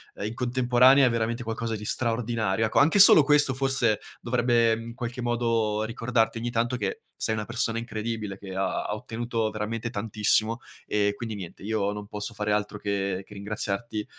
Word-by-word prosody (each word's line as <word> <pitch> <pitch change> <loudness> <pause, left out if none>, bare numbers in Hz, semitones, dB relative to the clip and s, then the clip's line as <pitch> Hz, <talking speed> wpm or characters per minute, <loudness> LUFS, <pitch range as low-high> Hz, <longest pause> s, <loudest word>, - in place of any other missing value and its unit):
ehm, - - -6
in 110 - -4
contemporanea 125 +2 +4
è - - +3
veramente 115 +1 -2
qualcosa 115 0 -4
di 105 - -9
straordinario, 115 -3 -1
ecco. 110 - +1
Anche 155 +8 +4
solo 190 -4 +12
questo, 145 -1 +4
forse, 130 -5 +1 0.2
dovrebbe, 120 -1 +2
mhmm, 115 - -8
in 115 - -8
qualche 120 0 -6
modo 115 -3 0
ricordarti 115 0 -1
ogni 120 +1 -3
tanto 120 +1 -1
che 100 -4 -4 0.2
sei 110 - 0
una 105 - -4
persona 115 0 -1
incredibile 110 -3 -5
che 95 -2 -9
ha 95 -1 -2
ha - - -4
ottenuto 115 0 -3
veramente 110 +2 -4
tantissimo. 110 +1 0 0.3
E, 100 -1 0
quindi, 110 -1 -6
niente, 95 -2 -10
io 105 -1 -1
non 105 0 -8
posso 105 +2 -6
fare 105 0 -3
altro 105 0 -1
che 105 - -12 0.4
che, - - -14
ehm, - - -13
ringraziarti 105 +1 -4
115 Hz, 185 wpm, -26 LUFS, 105-120 Hz, 0.4 s, solo